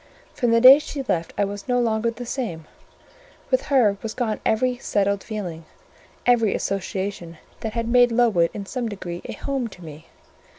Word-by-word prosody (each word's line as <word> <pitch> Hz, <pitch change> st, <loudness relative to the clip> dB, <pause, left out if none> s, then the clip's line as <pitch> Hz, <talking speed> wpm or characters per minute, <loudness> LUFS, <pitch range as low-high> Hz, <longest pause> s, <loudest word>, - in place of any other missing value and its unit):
From 245 Hz, -, 0 dB
the 230 Hz, 0 st, +4 dB
day 260 Hz, +4 st, +9 dB
she 295 Hz, -2 st, -5 dB
left 165 Hz, -1 st, -1 dB
I 205 Hz, -, +2 dB
was 200 Hz, 0 st, -7 dB
no 245 Hz, -1 st, +2 dB
longer 230 Hz, -1 st, +1 dB
the 240 Hz, +1 st, -7 dB
same: 220 Hz, -, -4 dB, 0.9 s
with -, -, +2 dB
her 235 Hz, -8 st, +3 dB
was 225 Hz, -1 st, -5 dB
gone 225 Hz, -4 st, -1 dB
every 245 Hz, +3 st, +1 dB
settled 200 Hz, -4 st, 0 dB
feeling, 180 Hz, -7 st, -6 dB, 0.6 s
every 230 Hz, -4 st, +3 dB
association 190 Hz, -3 st, -4 dB, 0.2 s
that 220 Hz, -1 st, -4 dB
had 230 Hz, -1 st, -2 dB
made 245 Hz, 0 st, +5 dB
Lowood 225 Hz, -8 st, +3 dB
in 200 Hz, -, -7 dB
some 240 Hz, +2 st, -3 dB
degree 180 Hz, -4 st, -6 dB
a -, -, -5 dB
home 270 Hz, -4 st, -3 dB
to 180 Hz, -5 st, -13 dB
me. 155 Hz, 0 st, -11 dB
220 Hz, 175 wpm, -23 LUFS, 195-245 Hz, 0.9 s, day